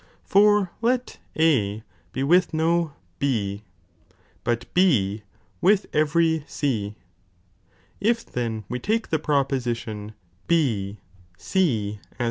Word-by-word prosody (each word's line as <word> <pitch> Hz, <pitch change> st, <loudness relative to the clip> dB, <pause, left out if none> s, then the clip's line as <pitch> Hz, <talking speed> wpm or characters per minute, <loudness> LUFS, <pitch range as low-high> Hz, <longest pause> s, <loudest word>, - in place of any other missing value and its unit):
For 205 Hz, -2 st, +4 dB
let 245 Hz, +2 st, 0 dB, 0.2 s
A 110 Hz, -10 st, +2 dB, 0.3 s
be 130 Hz, +6 st, -2 dB
with 170 Hz, +3 st, +3 dB
no 165 Hz, -1 st, +1 dB, 0.3 s
B, 105 Hz, -6 st, -1 dB, 0.8 s
but 120 Hz, +1 st, -1 dB
B 110 Hz, -, +3 dB, 0.4 s
with 200 Hz, +1 st, +4 dB
every 160 Hz, +1 st, +2 dB
C, 110 Hz, -8 st, -2 dB, 1.0 s
if 230 Hz, +3 st, +1 dB
then 115 Hz, -3 st, -3 dB
we 125 Hz, -, -3 dB
take 220 Hz, -, -1 dB
the 160 Hz, -, +2 dB
proposition 120 Hz, -7 st, -1 dB, 0.3 s
B 110 Hz, -12 st, +1 dB, 0.4 s
Ex.. -, -, -12 dB
140 Hz, 100 wpm, -24 LUFS, 110-170 Hz, 1.0 s, For